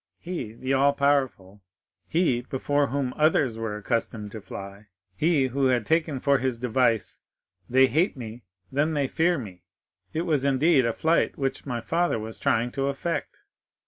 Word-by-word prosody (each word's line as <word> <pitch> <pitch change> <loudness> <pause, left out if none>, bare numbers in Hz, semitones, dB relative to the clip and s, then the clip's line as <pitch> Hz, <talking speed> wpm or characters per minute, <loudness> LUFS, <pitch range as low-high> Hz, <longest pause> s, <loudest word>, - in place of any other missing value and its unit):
—he, 165 -11 -5
the 130 +3 -2
all 140 +1 +4
powerful—he, 125 - -1
before 145 +1 +1
whom 135 -2 -2
others 150 -6 +3
were 110 -2 -4
accustomed 105 -1 -2
to 110 - -8
fly—he, 100 - -3
who 135 +2 0
had 125 -4 +1
taken 160 -4 +1
for 140 +1 +3
his 130 -2 -1
device, 115 -2 +1 0.5
'They 130 +2 +6
hate 155 - +1
me; 115 -1 -8 0.3
then 150 +3 +1
they 140 -2 +1
fear 170 +5 +1
me!' 95 -9 -8 0.5
"It 160 - -1
was, 155 -6 +1
indeed, 140 -1 +3
a - - +1
flight 160 +8 +1
which 135 0 -3
my 120 -3 -2
father 170 +2 0
was 110 0 -6
trying 120 +2 +1
to 135 +1 -1
effect. 140 +5 -3
130 Hz, 155 wpm, -26 LUFS, 115-145 Hz, 0.5 s, They